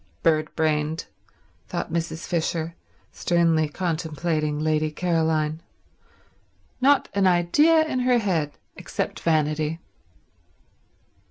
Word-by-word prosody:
"Bird 155 -1 +2
brained," 155 0 0 0.6
thought - - -4
Mrs. 165 0 -3
Fisher, 165 -1 -1 0.4
sternly 165 -3 +2
contemplating 155 -2 -2
Lady 155 0 +1
Caroline. 160 -1 0 1.2
"Not 280 +2 +4
an 200 -1 +3
idea 295 - +4
in 260 -5 -2
her 250 0 +3
head 170 -9 -1 0.2
except - - -4
vanity." 155 0 0
160 Hz, 90 wpm, -24 LUFS, 155-175 Hz, 1.2 s, Not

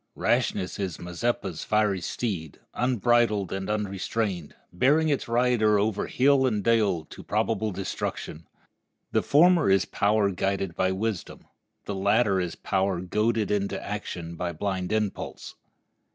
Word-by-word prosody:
Rashness 90 - 0
is 95 -5 -3
a - - -11
Mazeppa's 95 0 -2
fiery 105 -3 +1
steed, 85 - -4
unbridled 120 -5 +2
and 95 +1 -4
unrestrained, 100 -4 -2 0.2
bearing 150 - +3
its 145 - 0
rider 115 -3 +3
over 105 0 0
hill 135 0 +3
and 105 -5 -1
dale 105 -8 +2
to - - -11
probable 110 0 0
destruction. 90 -4 -5 0.6
The - - +2
former 170 - +4
is 95 -1 +4
power 100 -1 +1
guided 95 -1 -2
by 95 0 +1
wisdom; 100 0 -4 0.4
the 100 - -3
latter 100 +1 +2
is 90 -2 -3
power 95 -2 0
goaded 105 +1 0
to - - -5
action 90 -5 -5
by 85 0 -3
blind 95 +2 -3
impulse. 105 -2 -3
100 Hz, 135 wpm, -26 LUFS, 95-115 Hz, 0.6 s, former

